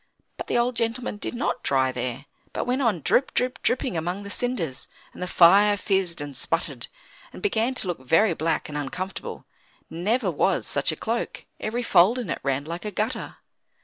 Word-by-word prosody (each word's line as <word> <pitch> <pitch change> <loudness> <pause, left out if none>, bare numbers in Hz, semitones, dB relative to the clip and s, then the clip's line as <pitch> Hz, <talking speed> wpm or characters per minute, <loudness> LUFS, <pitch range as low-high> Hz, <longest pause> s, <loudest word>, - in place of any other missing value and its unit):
But - - -6
the - - +1
old 240 +1 +1
gentleman 230 -1 -2
did 205 - -4
not 250 0 -1
dry 130 -1 +2
there, 125 +2 -4 0.3
but - - -2
went 255 +2 0
on 215 - +1
drip, 265 - +2
drip, 250 +1 0
dripping 250 -3 0
among 175 +5 -2
the 200 - -7
cinders, 170 - -1 0.3
and - - -11
the 180 - -2
fire 200 +4 +6
fizzed 190 -6 0
and 145 -2 -6
sputtered, 130 - -1 0.4
and - - -10
began 255 - +1
to 200 - -1
look 175 -5 -2
very 165 +10 +3
black 165 +1 -1
and 150 - -8
uncomfortable; 180 +7 -5 0.5
never 200 +5 0
was 180 +4 +1
such 140 +3 +2
a - - -4
cloak; 230 +7 -3
every 235 +3 -2
fold 195 +3 +5
in 230 - -3
it - - -2
ran 140 +1 -1
like 170 +2 -5
a 210 - -2
gutter. 215 +4 -2
195 Hz, 190 wpm, -25 LUFS, 160-235 Hz, 0.5 s, fire